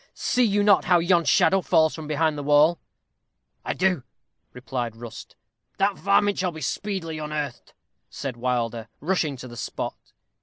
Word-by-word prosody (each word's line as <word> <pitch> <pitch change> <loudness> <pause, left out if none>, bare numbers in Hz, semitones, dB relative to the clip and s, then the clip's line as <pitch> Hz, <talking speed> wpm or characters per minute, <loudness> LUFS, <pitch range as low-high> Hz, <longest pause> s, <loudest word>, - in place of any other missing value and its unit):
See 250 - +1
you 205 -2 +2
not 205 -2 +4
how 180 -1 +5
yon 170 0 +2
shadow 190 +6 +4
falls 160 -2 +3
from 155 -2 -7
behind 155 +1 +1
the 145 - -4
wall?" 150 +4 +4 0.8
"I - - -3
do," 180 -5 +1 0.5
replied 125 -2 -4
Rust. 115 -1 -10 0.4
"The 200 +1 +2
varmint 200 +2 +2
shall 180 -1 0
be 160 -1 -9
speedily 165 0 -3
unearthed," 150 -4 -5 0.3
said 135 -4 -5
Wilder, 120 -2 -2
rushing 155 -4 -1
to 130 - -9
the 120 - -10
spot. - - -6
155 Hz, 155 wpm, -24 LUFS, 130-185 Hz, 0.8 s, how